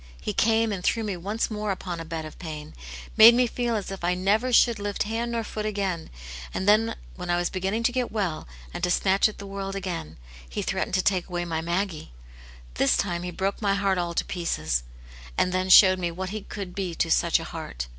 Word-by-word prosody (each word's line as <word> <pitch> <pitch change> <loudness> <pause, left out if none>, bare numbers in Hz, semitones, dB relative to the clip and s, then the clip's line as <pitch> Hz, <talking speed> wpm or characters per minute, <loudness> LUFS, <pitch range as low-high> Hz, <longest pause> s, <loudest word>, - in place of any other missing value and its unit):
He 65 - -3
came 225 0 +2
and 190 -3 -4
threw 225 - +1
me 205 -3 -2
once 205 +7 -2
more 210 0 -3
upon 185 -3 -3
a 165 - -6
bed 160 -1 -5
of 155 - -11
pain, 155 -3 -7 0.4
made 230 +2 +10
me 250 +1 +4
feel 240 0 -1
as 200 -3 -3
if 195 -2 -7
I 180 +1 +2
never 210 +7 +1
should 235 -1 +5
Uft 205 0 -2
hand 230 +3 -2
nor 230 -1 -1
foot 215 0 -5
again, 195 -5 -2 0.5
and 190 - -2
then 225 +2 +4 0.2
when 180 -1 -6
I 175 - +2
was 175 0 -1
begin 190 +2 -1
ning 230 - -1
to 235 - +3
get 250 -1 -1
well 195 -8 -2 0.3
and - - -6
to 180 - +2
snatch 195 +3 +3
at 215 - -11
the 200 - -8
world 195 0 -5
again, 175 - -5 0.3
He - - -3
threatened - - -1
to 185 - +2
take 185 -2 +1
away 175 -1 -2
my 160 -2 -2
Maggie. 170 - -3 0.6
This 135 - +2
time 175 -3 -1
he 180 - -4
broke 190 +4 -2
my 200 -2 +2
heart 195 -2 +1
all 170 -1 -2
to - - 0
pieces, 80 - -1 0.6
and 185 - +2
then 185 +1 -1
showed 185 0 +8
me 175 -1 -1
what 185 +2 -5
he 215 0 -4
could 195 -2 -7
be 185 -3 -3
to 165 - 0
such - - +3
a - - -6
heart. - - -6
190 Hz, 235 wpm, -26 LUFS, 175-210 Hz, 0.6 s, made